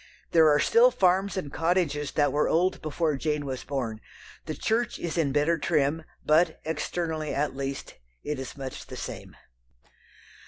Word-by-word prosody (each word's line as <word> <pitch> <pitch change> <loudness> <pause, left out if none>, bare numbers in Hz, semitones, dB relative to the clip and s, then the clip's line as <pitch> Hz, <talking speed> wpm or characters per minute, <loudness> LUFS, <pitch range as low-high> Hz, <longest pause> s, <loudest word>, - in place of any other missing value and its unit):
There 160 -2 +6
are 145 - +5
still 235 - +5
farms 195 -3 +2
and 145 -7 -4
cottages 160 -4 0
that 145 -1 +2
were 150 - +2
old 180 +3 +2
before 155 0 0
Jane 150 0 -1
was 130 -2 -4
born. 120 -6 -3 0.5
The - - -3
church 235 +2 0
is 170 - -4
in 160 -5 +1
better 150 +4 +2
trim, 155 +1 +1 0.2
but, 160 +2 +3
externally 160 0 -2
at 145 -1 -1
least, 135 0 -4 0.3
it 150 -2 -3
is 135 +2 -7
much 135 -1 -7
the - - -8
same. - - -7
155 Hz, 160 wpm, -27 LUFS, 140-170 Hz, 0.5 s, There